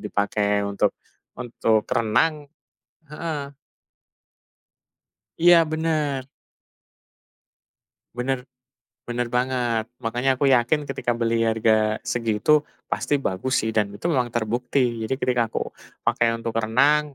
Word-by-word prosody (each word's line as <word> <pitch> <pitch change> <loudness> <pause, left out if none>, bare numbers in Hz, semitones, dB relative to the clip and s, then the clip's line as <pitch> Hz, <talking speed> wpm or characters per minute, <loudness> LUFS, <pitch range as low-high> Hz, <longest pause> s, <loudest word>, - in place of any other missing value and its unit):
dipakai, 105 0 0
untuk 100 -1 0 0.4
untuk 115 -3 0
renang 145 +7 +1 0.6
heeh. 150 -3 -5 1.9
Iya, 170 -1 +7
bener. 155 -4 -1 1.9
Bener 130 +1 0 0.7
bener 120 0 -2
banget. 125 -3 0 0.2
Makanya 120 +4 +1
aku 140 +2 0
yakin, 135 +5 +1
ketika 125 -2 -1
beli 115 -1 +1
harga 110 -1 +2
segitu, 120 +4 +1 0.3
pasti - - 0
bagus 115 +5 -2
sih. 110 - -1
Dan 105 -2 0
itu - - -13
memang 130 -6 +2
terbukti. 120 +4 0 0.3
Jadi 130 - -1
ketika 125 -2 +1
aku - - -4 0.3
pakai 115 0 +2
untuk 115 0 -4
renang, 140 +6 +2
120 Hz, 105 wpm, -23 LUFS, 110-140 Hz, 1.9 s, Iya